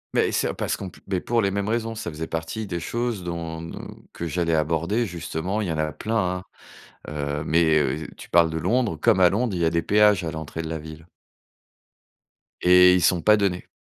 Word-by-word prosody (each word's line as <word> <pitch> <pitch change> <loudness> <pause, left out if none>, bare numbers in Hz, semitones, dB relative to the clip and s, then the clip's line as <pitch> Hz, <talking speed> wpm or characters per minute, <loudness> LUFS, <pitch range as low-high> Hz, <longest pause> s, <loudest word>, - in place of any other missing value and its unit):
Mais - - +2
c'est - - 0
parce - - -2
qu'on 95 -2 -7
p - - -17
beh, 95 -2 -1
pour 120 0 +1
les 100 - +1
mêmes 100 +1 -2
raisons, 115 0 -1
ça 110 -6 -5
faisait 80 +1 -5
partie 80 +7 -4
des 90 -3 -3
choses 115 +2 -3
dont 85 -1 -5
dont 85 - -8 0.3
que 85 - -5
j'allais 85 +1 0
aborder, 85 +9 0
justement, 85 +3 -3
il 105 - -1
y - - -1
en 80 - -2
a 75 0 0
plein, 95 -4 -2 0.6
hein, - - -6
heu, 75 0 -3
mais 80 -1 +3
heu, 75 +2 -1
tu - - -12
parles 85 -1 +4
de 80 - -3
Londres, 115 +2 +1
comme 95 - +3
à 90 -1 +6
Londres, 110 +2 0
il 90 - -2
y - - +3
a - - +4
des 85 0 0
péages 105 -1 +4
à 80 - -3
l'entrée 80 0 -5
de 80 - -6
la 80 - -3
ville 80 +1 -10 1.6
et 90 0 +7
ils 90 - +3
sont 90 +1 +3
pas 105 +3 +5
donnés 95 -3 -1
85 Hz, 225 wpm, -24 LUFS, 80-100 Hz, 1.6 s, et